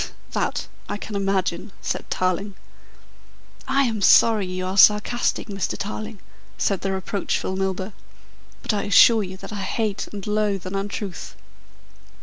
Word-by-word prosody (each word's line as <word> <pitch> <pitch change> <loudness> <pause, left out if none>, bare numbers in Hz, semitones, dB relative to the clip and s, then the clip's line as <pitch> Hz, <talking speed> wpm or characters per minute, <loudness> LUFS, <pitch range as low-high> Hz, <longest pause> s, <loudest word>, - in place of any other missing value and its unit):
"That - - -1 0.2
I - - -2
can 210 0 -7
imagine," 195 -1 -1
said - - -4
Tarling. 185 +2 -1 1.1
"I 275 +1 +3
am 225 -5 -1
sorry 210 0 +5
you 185 0 -4
are 185 +1 -3
sarcastic, 210 +4 +4
Mr. 195 -3 -3
Tarling," 215 +1 -5 0.4
said 195 -3 0
the 195 - -1
reproachful 190 0 -2
Milburgh, 190 +1 -2 0.7
"but 235 - 0
I 205 - -1
assure 220 +2 +7
you 190 -1 -6
that 195 +2 -9
I 205 - -4
hate 210 0 -2
and 200 -2 -7
loathe 210 -3 0
an 185 - -5
untruth." 195 -1 -4
200 Hz, 140 wpm, -23 LUFS, 190-210 Hz, 1.1 s, assure